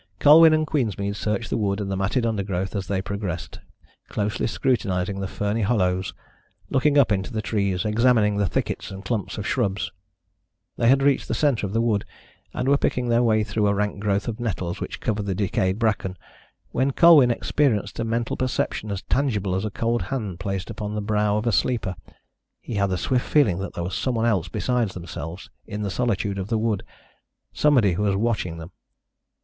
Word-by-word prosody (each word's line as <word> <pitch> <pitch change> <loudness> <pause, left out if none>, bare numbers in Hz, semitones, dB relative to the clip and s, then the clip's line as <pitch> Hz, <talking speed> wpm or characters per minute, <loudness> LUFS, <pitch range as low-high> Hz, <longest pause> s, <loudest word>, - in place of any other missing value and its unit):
Colwyn 160 - +8
and 155 0 +2
Queensmead 100 - -1
searched 105 +2 -2
the - - +1
wood 100 -1 0
and 100 -2 -3
the - - -1
matted 100 +6 0
undergrowth 100 -3 -2
as 95 -3 -3
they 95 -1 -1
progressed, 100 -5 -5 0.5
closely 105 0 -1
scrutinising 100 -6 0
the 95 - -2
ferny 105 +4 -2
hollows, 95 -4 0 0.6
looking 145 +2 +3
up 135 -6 +5
into 100 +3 -1
the 110 - -2
trees, 100 -4 -1
examining 110 -1 +3
the 100 -2 +1
thickets - - -2
and 95 +1 -9
clumps 110 -5 -2
of 105 - -4
shrubs. 105 -6 -1 0.8
They 115 - +1
had 135 +1 +4
reached 140 -1 +2
the - - -1
centre 125 -6 +1
of 95 - -7
the 115 - +2
wood, 110 -4 +1 0.5
and 125 - -3
were 140 +1 +4
picking 125 -1 0
their 120 0 +3
way 110 -2 +3
through 105 0 0
a 100 - +2
rank 105 0 -1
growth 100 +1 0
of 115 0 -4
nettles 95 -7 -3
which - - -5
covered 105 -2 -2
the 95 - -1
decayed 95 -1 0
bracken, 105 -5 -1 0.5
when 135 +1 +1
Colwyn 160 -7 +7
experienced 115 -4 0
a - - 0
mental 115 +1 -1
perception 125 -4 -2
as 100 -1 -4
tangible 105 -9 0
as 95 +3 -1
a - - -1
cold 115 +3 -1
hand 105 -10 -3
placed 95 -2 -3
upon 105 0 -5
the 105 - -2
brow 105 0 +1
of 105 - -2
a 120 - +2
sleeper. 105 -2 0 0.6
He - - -8
had 100 -2 +1
the 95 - -1
swift 125 +6 -1
feeling 110 - +3
that 95 - -5
there 85 - -3
was 90 +2 -4
somebody 120 -1 0
else 95 -6 0
besides 120 +3 -1
themselves 85 0 -7 0.2
in 105 0 -4
the 100 - -2
solitude 100 -4 -1
of 95 - -4
the 115 0 0
wood 110 -3 0 0.7
somebody 125 -11 +3
who 90 - -2
was 100 -2 +1
watching 100 -6 -1
them. 85 +1 -9
105 Hz, 195 wpm, -24 LUFS, 95-120 Hz, 0.8 s, Colwyn